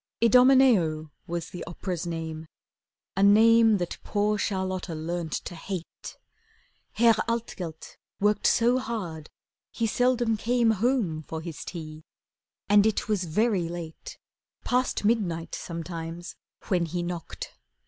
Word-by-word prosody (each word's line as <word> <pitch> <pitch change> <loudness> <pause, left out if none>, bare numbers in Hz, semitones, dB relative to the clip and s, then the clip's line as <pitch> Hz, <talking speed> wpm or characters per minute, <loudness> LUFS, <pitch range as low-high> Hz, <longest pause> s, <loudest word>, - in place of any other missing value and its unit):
'Idomeneo' 230 - +5 0.2
was 170 -1 -4
the 175 - -6
opera's 175 -1 -4
name, 160 -1 -5 0.7
A 195 - 0
name 220 +2 +6
that 175 -2 -4
poor 210 0 +1
Charlotta 185 -4 -2
learnt 165 0 -4
to - - -4
hate. 175 +1 -7 0.8
Herr 230 +1 +5 0.2
Altgelt 185 -8 -5 0.2
worked 205 0 +2
so 240 +2 +3
hard 180 -11 -5 0.4
he 230 - -2
seldom 240 0 +2
came 235 +1 +2
Home 215 -7 0
for 160 +1 -6
his 160 -1 -7
tea, 155 -3 -8 0.7
and 205 +1 +5
it 220 - -1
was 205 -4 0
very 185 0 +1
late, 175 - -8 0.5
Past 250 -3 0
midnight 185 -7 0
sometimes, 170 0 -6 0.3
when 175 -3 +1
he 175 +2 -3
knocked. 175 -1 -6
185 Hz, 120 wpm, -27 LUFS, 165-225 Hz, 0.8 s, name